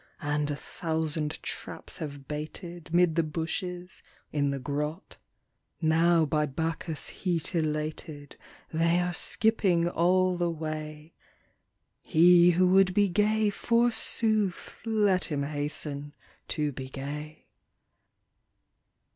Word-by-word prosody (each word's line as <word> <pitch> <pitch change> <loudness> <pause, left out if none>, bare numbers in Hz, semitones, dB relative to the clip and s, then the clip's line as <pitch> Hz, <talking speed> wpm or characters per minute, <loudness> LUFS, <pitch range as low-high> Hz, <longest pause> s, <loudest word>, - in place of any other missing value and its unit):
And 145 0 0
a 145 - -1
thousand 160 -1 -3
traps - - -6
have 140 -3 -7
baited 160 +3 -7
Mid 175 -1 +4
the 165 - +2
bushes, 175 +3 -4 0.3
in 145 -2 +1
the 140 - -2
grot; 150 +4 -4 0.6
Now 165 +1 +3
by 150 0 0
Bacchus* 160 +2 -3
heat 175 -2 -2
elated 155 -2 -3 0.4
They 165 +2 +3
are 180 0 -1
skipping 190 -5 +2
all 180 +2 +2
the 175 -1 0
way: 155 -1 -6 0.9
He 175 +2 +6
who 180 +1 +3
would 190 -1 +4
be 205 -1 +4
gay, 210 +2 +2
forsooth, 225 -3 +1
Let 205 -5 +2
him 145 -4 -2
hasten 145 0 -2 0.3
to 150 -2 -1
be 130 -1 -7
gay. 150 +3 -7
160 Hz, 110 wpm, -28 LUFS, 150-180 Hz, 0.9 s, He